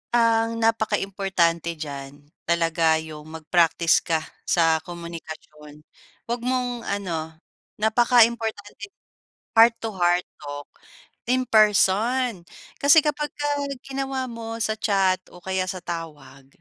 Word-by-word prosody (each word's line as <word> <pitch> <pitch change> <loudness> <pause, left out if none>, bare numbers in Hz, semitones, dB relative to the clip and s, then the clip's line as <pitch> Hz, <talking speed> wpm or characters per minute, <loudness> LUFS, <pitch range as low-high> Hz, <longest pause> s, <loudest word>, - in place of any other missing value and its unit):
Ang 230 -1 +2
napakaimportante 195 -6 0
diyan 140 -3 -7 0.3
talaga 165 -1 +2
yung 155 -1 -7
mag-practice 165 +1 +2
ka 160 -1 -1 0.2
sa 165 -2 +3
komunikasyon 160 -3 -10 0.4
wag 240 +1 -2
mong 250 -1 -1
ano 165 -6 -3 0.4
napakaimportante, 220 -2 +2 0.7
heart 230 +1 +7
to 225 - -2
heart 175 0 +2 0.2
talk 145 -1 -7 0.6
in 255 +1 +2
person 215 +1 +3 0.4
kasi 285 +3 +7
kapagka 295 -1 -3 0.4
ginawa 270 -1 -3
mo 225 -1 -6
sa 220 - 0
chat 195 -3 +2
o 175 0 -15
kaya 190 -1 -1
sa 185 0 -4
tawag 145 -6 -8
190 Hz, 105 wpm, -24 LUFS, 165-230 Hz, 0.7 s, heart